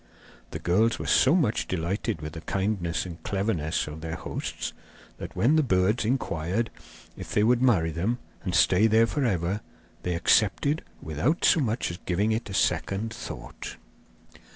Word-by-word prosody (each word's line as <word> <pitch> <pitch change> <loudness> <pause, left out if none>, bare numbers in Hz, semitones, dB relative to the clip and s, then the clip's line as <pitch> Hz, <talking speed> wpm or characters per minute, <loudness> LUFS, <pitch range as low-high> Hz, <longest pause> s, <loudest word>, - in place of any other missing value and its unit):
The - - -5
girls 110 +6 +2
were - - -5
so - - +5
much 145 -12 +1
delighted 95 +2 -2
with 75 0 -6
the 80 - -7
kindness 95 -2 -1
and 85 -2 -8
cleverness 95 -5 -1
of 75 +1 -8
their 80 0 -4
hosts - - -5 0.5
that, - - -7
when 145 +7 +3
the - - +5
birds 105 -2 +2
inquired 110 -3 -1 0.4
if - - -8
they 105 - +4
would 120 +2 +3
marry 95 -11 +3
them 95 +10 -1 0.3
and 90 -4 -2
stay 95 +4 +5
there 110 +1 +5
for 140 +5 -1
ever, 95 -2 0 0.4
they 90 -1 -1
accepted 115 - +2 0.2
without 80 - 0
so 165 - +5
much 115 - 0
as 85 - -7
giving 100 +5 +1
it 110 -1 -2
a - - -6
second 105 +4 0
thought. - - -8
100 Hz, 165 wpm, -27 LUFS, 85-115 Hz, 0.5 s, so